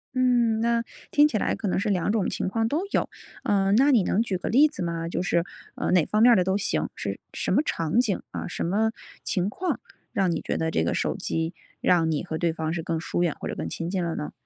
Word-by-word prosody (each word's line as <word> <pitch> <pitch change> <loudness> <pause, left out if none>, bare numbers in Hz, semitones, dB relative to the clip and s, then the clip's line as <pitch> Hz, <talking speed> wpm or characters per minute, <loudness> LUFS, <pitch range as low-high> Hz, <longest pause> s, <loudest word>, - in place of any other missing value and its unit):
嗯， 240 -3 +3
那 235 0 +2 0.3
听 295 +1 +6
起 245 - -1
来 - - 0
可 210 - -4
能 185 - +1
是 210 +2 -1
2 190 0 +1
种 215 -3 +1
情 - - -2
况 225 +4 0
都 295 +8 0
有， - - +1 0.3
呃， 195 -1 +2
那 275 +5 +5
你 235 -7 +5
能 195 - +1
举 200 -5 -1
个 180 - -4
例 280 +7 +6
子 295 - -8
吗？ 165 -1 -2
就 175 - -2
是， 170 -2 +1 0.3
呃， - - -1
哪 180 -4 +4
方 215 - +1
面 245 - +8
儿 - - +7
的 185 - +3
都 190 +2 +1
行， 205 - -1
是 - - -4
什 - - -2
么 - - +4
场 165 - 0
景， 220 -6 +1
啊， - - -4
什 - - -4
么 215 +6 +1 0.3
情 190 -2 0
况 365 - -2 0.3
让 190 -3 +2
你 165 - -2
觉 - - -2
得 160 0 -1
这 80 - +1
个 85 - 0
手 - - -1
机， 165 +1 -2 0.3
让 170 -3 +3
你 155 -2 -1
和 160 -3 -4
对 170 0 0
方 160 0 -2
是 170 - -2
更 165 0 -2
疏 175 - -2
远 170 -4 0
或 - - -4
者 - - -4
更 - - -4
亲 165 0 -4
近 185 -1 -1
了 170 -1 -2
呢？ 150 - -4
190 Hz, 275 characters per minute, -26 LUFS, 170-225 Hz, 0.3 s, 面